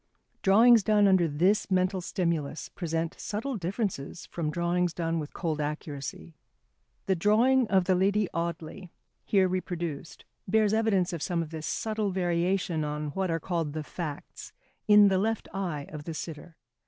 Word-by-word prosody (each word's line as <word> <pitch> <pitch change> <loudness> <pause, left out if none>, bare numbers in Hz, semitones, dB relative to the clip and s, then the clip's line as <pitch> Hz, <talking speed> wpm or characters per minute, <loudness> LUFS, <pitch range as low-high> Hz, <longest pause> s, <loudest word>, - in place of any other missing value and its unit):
Drawings 225 +4 +6
done 210 0 +4
under 185 -3 +4
this 180 +9 +1
mental 185 0 +1
stimulus 165 -5 -2
present 165 -2 -3
subtle 230 +6 -3
differences 180 - -3
from 165 -3 -3
drawings 175 +2 0
done 165 -1 -1
with 150 -1 -6
cold 160 -3 -2
accuracy. 145 - -5 0.7
The 190 - +2
drawing 230 +7 +3
of 190 -2 +3
the 185 +1 +2
Lady 200 +2 +2
Audley, 170 +2 -4 0.4
here 195 -2 +3
reproduced, 175 -4 -4 0.2
bears 215 +1 +3
evidence 200 -5 +2
of 165 - -4
some 170 -2 -1
of 155 - -10
this 155 -1 -5
subtle 215 -2 -1
variation 175 -2 0
on 150 0 -3
what 190 +4 -2
are 165 0 0
called 165 -4 -2
the 155 0 -4
facts, 150 -2 -7 0.4
in 210 -1 +7
the 190 -1 +2
left 225 +2 -1
eye 175 -7 -3
of 150 -1 -8
the 165 - -5
sitter. 160 +1 -8
175 Hz, 155 wpm, -28 LUFS, 160-200 Hz, 0.7 s, in